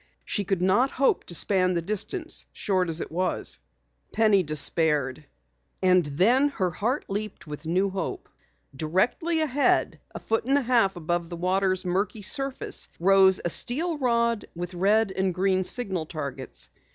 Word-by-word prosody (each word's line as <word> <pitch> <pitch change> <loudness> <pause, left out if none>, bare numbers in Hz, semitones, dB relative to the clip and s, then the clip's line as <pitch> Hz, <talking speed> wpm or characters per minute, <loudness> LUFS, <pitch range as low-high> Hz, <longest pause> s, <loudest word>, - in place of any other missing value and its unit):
She 205 - -2
could 190 -2 -1
not 205 +9 +3
hope 275 0 0
to 175 - -1
span 185 0 +3
the 170 - 0
distance, 215 - -4
short 185 -3 -1
though 165 0 0
it - - -12
was. 185 +3 0 0.5
Penny 215 -3 +3
despaired. 150 -3 +1 0.5
And 185 -1 +3
then 215 - +2
her 190 -10 -2
heart 230 - -2
leaped 205 +1 -5
with 150 0 -8
new 190 +4 +1
hope. 190 -3 -5 0.5
Directly 215 - 0
ahead, 285 -2 +1 0.2
a - - -4
foot 225 0 -2
and 275 +2 +2
a - - +1
half 230 -6 +3
above 175 0 -3
the 170 - -6
water's 185 +1 0
murky 195 +4 -2
surface, 275 +5 -1
rose 190 +1 +5
a 175 - 0
steel 310 - +1
rod 235 -3 +1
with 175 +1 -6
red 200 +3 +2
and 190 -2 -1
green 185 0 +1
signal 190 -6 +1
targets. 140 -5 -6
190 Hz, 155 wpm, -25 LUFS, 175-225 Hz, 0.5 s, rose